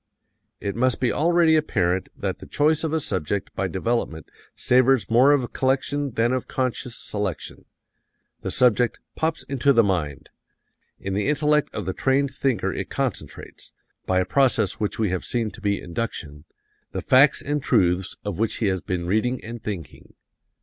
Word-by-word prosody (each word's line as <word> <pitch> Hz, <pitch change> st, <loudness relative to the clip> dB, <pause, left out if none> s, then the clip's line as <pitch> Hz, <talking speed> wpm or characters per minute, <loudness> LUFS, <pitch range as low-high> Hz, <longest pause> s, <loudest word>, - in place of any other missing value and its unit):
"It 100 Hz, -1 st, -4 dB
must 125 Hz, -1 st, +1 dB
be 125 Hz, -2 st, +1 dB
already 165 Hz, 0 st, +3 dB
apparent 95 Hz, -, 0 dB
that -, -, -3 dB
the -, -, -11 dB
choice 155 Hz, +2 st, +2 dB
of 160 Hz, -, -1 dB
a 160 Hz, -, +1 dB
subject 95 Hz, -, -2 dB
by 95 Hz, -, -1 dB
development 95 Hz, -, -2 dB, 0.2 s
savors 130 Hz, -1 st, +3 dB
more 125 Hz, +5 st, +6 dB
of 130 Hz, -4 st, +1 dB
collection 135 Hz, +1 st, 0 dB
than 120 Hz, +2 st, +2 dB
of 130 Hz, -, -2 dB
conscious 130 Hz, -1 st, -2 dB
selection. 100 Hz, -6 st, -4 dB, 0.8 s
The -, -, -4 dB
subject 125 Hz, -2 st, +2 dB, 0.2 s
'pops 160 Hz, 0 st, -1 dB
into 140 Hz, +1 st, +2 dB
the 115 Hz, -2 st, +5 dB
mind.'... 80 Hz, -, -2 dB, 0.7 s
In 95 Hz, -, -4 dB
the 100 Hz, +4 st, 0 dB
intellect 150 Hz, 0 st, +2 dB
of 105 Hz, -, -3 dB
the 95 Hz, -, -2 dB
trained 135 Hz, +3 st, +1 dB
thinker 130 Hz, -5 st, 0 dB
it -, -, -5 dB
concentrates -, -, -5 dB, 0.3 s
by 95 Hz, 0 st, +2 dB
a 95 Hz, -, +1 dB
process 120 Hz, -8 st, +2 dB
which 105 Hz, -2 st, -2 dB
we 110 Hz, -3 st, +1 dB
have 95 Hz, -, -2 dB
seen 115 Hz, -3 st, -1 dB
to -, -, -13 dB
be 100 Hz, -1 st, 0 dB
induction 85 Hz, -6 st, -5 dB, 0.5 s
the -, -, -3 dB
facts 135 Hz, +2 st, +5 dB
and 145 Hz, 0 st, -1 dB
truths 90 Hz, -4 st, +1 dB
of 100 Hz, -3 st, -4 dB
which 115 Hz, -1 st, +1 dB
he 115 Hz, -, -1 dB
has 95 Hz, -1 st, -1 dB
been 90 Hz, -2 st, -3 dB
reading 110 Hz, +7 st, 0 dB
and 115 Hz, +1 st, -7 dB
thinking. 95 Hz, -8 st, -7 dB
115 Hz, 170 wpm, -24 LUFS, 95-135 Hz, 0.8 s, more